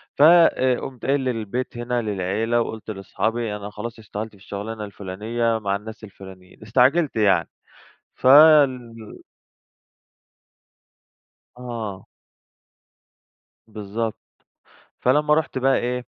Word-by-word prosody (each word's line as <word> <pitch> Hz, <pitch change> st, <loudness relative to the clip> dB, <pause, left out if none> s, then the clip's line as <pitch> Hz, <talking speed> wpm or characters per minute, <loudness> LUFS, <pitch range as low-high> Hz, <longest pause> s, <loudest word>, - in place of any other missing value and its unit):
ف -, -, -2 dB
آآ 155 Hz, -6 st, +5 dB
قُمت 130 Hz, -4 st, -8 dB
قايل 140 Hz, +1 st, +2 dB
للبيت 120 Hz, 0 st, -3 dB
هنا 120 Hz, 0 st, -2 dB
للعيلة، 110 Hz, +3 st, -1 dB
وقُلت 110 Hz, -1 st, -6 dB
لأصحابي: 110 Hz, +2 st, -3 dB
"أنا 105 Hz, 0 st, -7 dB
خلاص 110 Hz, +2 st, -8 dB
اشتغلت 110 Hz, +1 st, -6 dB
في -, -, -20 dB
الشغلانة 105 Hz, +2 st, -6 dB
الفُلانية، 110 Hz, +4 st, -3 dB
مع 100 Hz, -2 st, -1 dB
الناس 110 Hz, +2 st, -9 dB
الفُلانيين." 95 Hz, -3 st, -13 dB
استعجلت 130 Hz, +8 st, +2 dB
يعني. 100 Hz, -6 st, +2 dB, 0.7 s
فال 135 Hz, -4 st, +5 dB, 2.7 s
آه. 115 Hz, -6 st, -6 dB, 1.6 s
بالضبط، 110 Hz, +1 st, -4 dB, 0.8 s
فلما 150 Hz, +4 st, +2 dB
ُرحت 155 Hz, -3 st, -1 dB
بقى 135 Hz, +1 st, +2 dB
إيه، 125 Hz, 0 st, -3 dB
115 Hz, 100 wpm, -22 LUFS, 105-125 Hz, 2.7 s, آآ